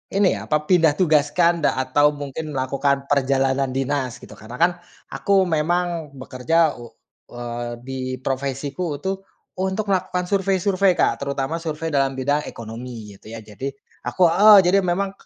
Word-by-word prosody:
ini, 195 -1 +4
apa, - - -1
pindah 160 -3 +3
tugaskan 170 +1 +2
da - - +2
atau 145 +3 +2
mungkin 145 +1 -6
melakukan 140 +1 0
perjalanan 135 -1 +1
dinas 135 -2 -1
gitu. - - -12
Karena 110 +3 -10
kan 175 +1 +5 0.4
aku 195 -1 +2
memang 170 -1 -1
bekerja 140 +4 0
u 120 - -9 0.5
eee, 120 0 -5
di 135 +1 -7 0.3
profesiku 140 +4 -3
itu 170 +7 -3 0.5
untuk 190 +3 -1
melakukan 180 -1 0
survei-survei 195 -1 +2
Kak, - - +1
terutama 140 +2 -2
survei 165 -1 -4
dalam 135 -2 +2
bidang 145 +3 0
ekonomi, 115 -2 -8
gitu 105 +3 -14
ya. - - -7
Jadi 105 +5 -7 0.4
aku - - -4
heeh, 210 +4 +8
jadi 180 +3 +4
memang, 185 +2 0
145 Hz, 145 wpm, -22 LUFS, 130-175 Hz, 0.5 s, heeh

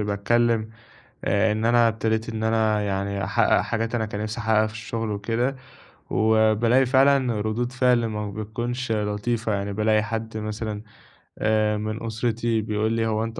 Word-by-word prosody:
باتكلِّم 110 +2 +1 0.6
آآ 105 +2 +2
إن 110 +1 -1
أنا 120 0 +5
ابتديت 110 0 -1
إن 110 -1 -4
أنا 110 -1 +2
يعني 100 0 -2
أحقّق 95 +1 +2
حاجات 115 +1 -2
أنا 110 -2 0
كان 105 -1 -5
نِفْسي 110 +2 -4
أحقّقها 110 -1 +2
في 110 - -10
الشُغل 110 0 -4
وكده 115 +6 -1 0.6
وبالاقي 110 +3 +3
فعلًا 130 -3 +3
ردود 115 +4 -2
فعل 125 -2 +2
ما 105 -1 -4
بتكونش 120 +4 -4
لطيفة، 105 +1 -1
يعني 100 0 -3
بالاقي 110 +1 +2
حد 110 0 -4
مثلًا 110 0 -4 0.6
آآ 110 -1 +1
من 110 +1 -4
أُسرتي 115 0 -1
بيقول 110 +1 -1
لي: 115 0 0
"هو 110 0 0
أنت 115 0 -5
110 Hz, 155 wpm, -24 LUFS, 105-115 Hz, 0.6 s, أنا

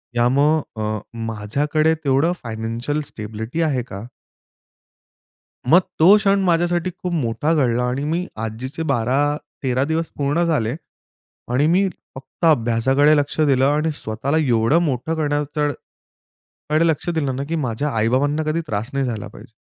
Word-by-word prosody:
यामुळे 135 0 +1
अ, 105 0 -2 0.3
माझ्याकडे 145 +9 0
तेवढं 140 +5 +2
फायनान्शियल 115 +6 -3
स्टॅबिलिटी 110 +3 -5
आहे 140 -6 +1
का? 100 +4 -7 1.6
मग 175 +5 +8 0.2
तो 185 +6 +8
क्षण 200 -1 +2
माझ्यासाठी 175 0 +1
खूप 180 -1 -2
मोठा 145 +2 0
घडला 125 -5 +1
आणि 125 +3 -1
मी 170 +4 -1 0.2
आजीचे 130 +8 -5
12-13 135 +1 0
दिवस 160 +1 -1
पूर्ण 145 +4 +1
झाले 135 -7 0 0.8
आणि 140 +5 +3
मी 190 +4 +3 0.3
फक्त 135 +6 -5
अभ्यासाकडे 135 +1 +3
लक्ष 145 +2 -2
दिलं 135 -3 +3
आणि 150 +2 +1
स्वतःला 135 +5 -2
एवढं 115 +7 +3
मोठं 150 +1 -1
करण्याकडं 150 -1 -1 1.0
कडे, 155 +2 +3
लक्ष 160 +2 0
दिलं 145 -6 -1
ना 135 - -3
की 165 - -1
माझ्या 140 -1 -1
आई-बाबांना 140 +7 +1
कधी 155 +2 0
त्रास 105 +3 -3
नाही 135 -1 0
झाला 110 -4 -4
पाहिजे. - - -14
145 Hz, 135 wpm, -21 LUFS, 120-160 Hz, 1.6 s, मग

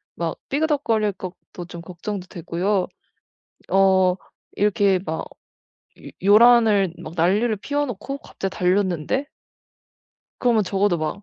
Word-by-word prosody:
막 170 -1 -3
삐그덕거릴 275 -8 +1
것도 180 -1 -9
좀 170 -1 -9
걱정도 180 +2 -6
되고요. 180 +3 -1 0.8
어 190 -1 +4 0.4
이렇게 200 -2 +2
막 160 -2 -3 0.8
요 - - -11
요란을 210 -3 +5
막 155 - -8
난리를 205 +7 +2
피워 290 +7 -1
놓고 275 +3 -6
갑자기 195 -7 -6
달렸는데 185 - 0 1.1
그러면 235 -4 +3
적어도 190 -2 +1
막 155 +6 -4
195 Hz, 245 characters per minute, -22 LUFS, 180-220 Hz, 1.1 s, 요란을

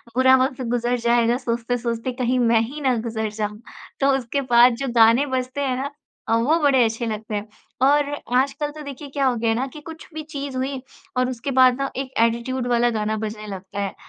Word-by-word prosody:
"बुरा 260 +1 +6
वक़्त 260 -1 -3
गुज़र 245 0 0
जाएगा, 235 0 +2
सोचते-सोचते 235 0 -2
कहीं 250 0 0
मैं 230 -2 +4
ही 275 +7 -5
ना 260 -3 +2
गुज़र 220 -1 -3
जाऊँ।" 210 0 -4 0.4
तो 275 - +3
उसके 265 +2 -2
बाद 240 +1 +7
जो 275 - -3
गाने 230 +4 +6
बजते 255 +2 -3
हैं 265 -2 0
ना 280 +2 -3 0.4
अ, 225 - +2
वो 295 +9 +2
बड़े 275 -4 +4
अच्छे 225 +2 -2
लगते 215 -1 -4
हैं। 205 +1 -4 0.3
और 285 +1 +4 0.3
आजकल 280 +3 0
तो 305 +1 -10
देखिए, 285 0 -8
क्या 275 0 -1
हो 250 - +1
गया 230 0 0
है 225 - +2
ना 250 +3 -1
कि 300 - -11
कुछ 320 +1 -10
भी 315 - -5
चीज़ 280 -3 -6
हुई 265 0 -3 0.4
और 255 0 +2
उसके 255 +2 -4
बाद 255 -1 +5
ना 275 - -1
एक 265 -1 -4
एटीट्यूड 235 +2 0
वाला 240 0 +3
गाना 215 0 -1
बजने 215 0 -5
लगता 195 0 -7
है। 200 -1 -3
250 Hz, 215 wpm, -22 LUFS, 230-270 Hz, 0.4 s, बाद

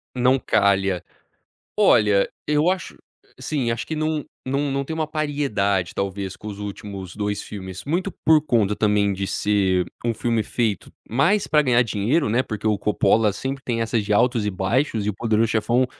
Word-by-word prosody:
Não 125 +2 +3
calha. 95 -5 +1 0.7
Olha, 105 -2 +4 0.2
eu 150 +3 +3
acho 185 -1 -3 0.4
sim, 140 -6 -1
acho 115 0 -2
que 160 - -4
não 155 -1 -1 0.2
não 140 +2 -1
não 140 0 -1
tem 160 - -5
uma 160 -1 -1
paridade, 140 - -1
talvez, 95 -1 -3
com 105 - -10
os 100 -2 -6
últimos 100 -2 -7
2 105 -1 -2
filmes, 95 -3 -8
muito 175 +7 -1 0.2
por 155 -1 +6
conta, 110 -8 +2
também, 105 -1 +2
de 95 0 -3
ser 95 -4 +1 0.2
um 120 - +1
filme 115 0 0
feito 110 -4 -2 0.2
mais 145 - +2
pra 150 -1 +4
ganhar 125 -4 +3
dinheiro, 115 +7 0
né, 120 +4 +2
porque 110 -4 -6
o 105 -1 +2
Coppola 105 +1 +2
sempre 135 +6 -4
tem 115 -3 -1
essas 115 -1 0
de 105 - 0
altos 120 0 +2
e 105 - +1
baixos, 105 +4 0
e - - +1
o - - -2
Poderão 110 +1 +1
Chefão, 115 +3 +1
110 Hz, 180 wpm, -22 LUFS, 100-135 Hz, 0.7 s, por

